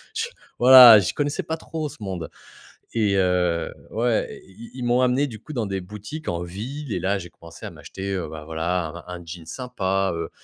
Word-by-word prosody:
je 450 +1 0 0.3
voilà, 125 -2 +11
je 95 - -1
connaissais 145 0 -1
pas 160 - -3
trop 160 -1 -5
ce 150 - -12
monde 95 -5 -5 0.6
et 105 -4 +2
heu 90 -2 +1 0.2
ouais, 115 0 -1
ils 110 +5 -12
ils - - -8
ils - - -4
m'ont 120 +1 +3
amené, 130 +3 +2
du 110 -5 -9
coup, 155 - -10
dans 120 -5 -1
des 95 -1 -3
boutiques 105 - -8
en 85 0 -2
ville 115 +9 -6
et - - -1
là, 100 +2 0
j'ai 90 -2 -8
commencé 85 -1 -12
à - - -6
m'acheter, 100 +1 -6
heu, 90 -3 -3
bah, 80 -1 -8
voilà, 80 +1 -3
un 90 -1 -6
un 85 - -13
jean 85 -1 -9
sympa, 95 -4 -1
heu, 85 - -4
100 Hz, 215 wpm, -23 LUFS, 90-125 Hz, 0.6 s, voilà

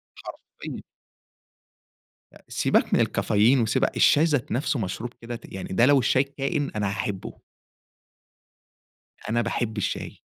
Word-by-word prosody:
حرفيًا. - - -9 1.5
أ - - -17
سيبك - - +1
من - - +4
الكافيين 115 +6 +3
وسيبك 125 +4 0
الشاي 150 - +5
ذات 145 -6 0
نفسُه 130 +2 0
مشروب 110 +4 -4
كده، 120 +1 -6
ت 115 - -10
يعني 95 -1 -6
ده 115 +5 +4
لو 140 +1 +5
الشاي 130 +2 +3
كائن، 140 +1 -3
أنا 105 -1 0
هاحبُه. 100 0 -4 1.9
أنا 120 +2 +1
باحب 115 -1 -2
الشاي. 105 - -3
120 Hz, 130 wpm, -25 LUFS, 110-135 Hz, 1.9 s, الشاي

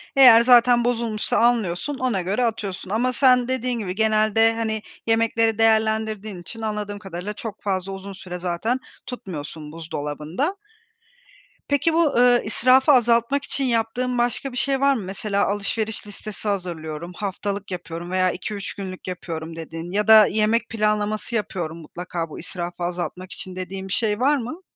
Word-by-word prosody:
Eğer 250 -4 +9
zaten 240 0 +6
bozulmuşsa 230 -3 0
anlıyorsun, 235 +2 +1
ona 250 -8 0
göre 200 +8 0
atıyorsun. 200 -5 -4
Ama 245 +5 +1
sen, 250 -1 +4
dediğin 255 -2 -1
gibi, 185 -4 -4
genelde, 220 +1 +3
hani, 220 -1 -2 0.3
yemekleri 225 -1 +2
değerlendirdiğin 220 -3 +1
için 225 +6 -7
anladığım 210 -2 -3
kadarıyla 195 +1 -6
çok 215 0 -7
fazla 195 -1 -1
uzun 195 +1 -7
süre 180 -1 -7
zaten 180 +8 -1 0.3
tutmuyorsun 160 - -7
buzdolabında. 160 - -3 1.1
Peki 285 +3 +2
bu, 330 -3 +3
ııı, 245 0 +5
israfı 255 +6 +4
azaltmak 240 +2 +3
için 280 - -1
yaptığın 245 +1 0
başka 240 +3 0
bir 250 - -7
şey 270 0 +1
var 280 0 +5
mı? 230 - -3
Mesela 200 +2 -1
alışveriş 210 +2 -2
listesi 210 +1 -8
hazırlıyorum, 170 -3 -4
haftalık 200 0 -4
yapıyorum 175 -1 -6
veya 185 -1 +2
2-3 200 +2 -5
günlük 185 -2 -7
yapıyorum 165 -3 -5
dediğin 165 +1 -7
ya 210 +2 0
da 220 -1 +9
yemek 220 +3 +1
planlaması 215 +1 -1
yapıyorum 180 -7 -3
mutlaka 170 +1 -5
bu - - -9
israfı 175 0 -5
azaltmak 180 +1 -4
için 185 -1 -6
dediğin 190 +1 -6
bir 190 - -3
şey 210 -2 +1
var 280 +3 +3
mı? 265 +9 -6
215 Hz, 155 wpm, -23 LUFS, 185-235 Hz, 1.1 s, Eğer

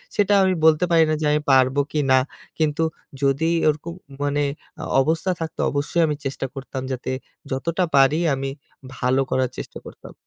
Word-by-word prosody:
সেটা 205 0 +3
আমি 190 0 +3
বলতে 160 +2 +5
পারি 165 -1 +6
না - - +2
যে - - 0
আমি 150 0 +2
পারব 130 0 +4 0.2
কি 150 - 0
না। 130 - +7 0.4
কিন্তু 155 0 +1 0.4
যদি 140 +4 +2 0.2
ওরকম 155 +3 -3 0.3
মানে 145 0 +1 0.4
আ - - -5 0.2
অবস্থা 165 +5 0
থাকতো 160 - -5
অবশ্যই 145 +4 0
আমি 150 - -1
চেষ্টা 135 0 -3
করতাম 135 -1 -6
যাতে 130 0 -3 0.4
যতটা 170 +7 -1
পারি 135 +4 +5
আমি 135 0 -2 0.5
ভালো 130 +2 +2
করার 130 -1 +1
চেষ্টা - - -7
করতাম। - - -12
145 Hz, 170 wpm, -22 LUFS, 135-160 Hz, 0.5 s, না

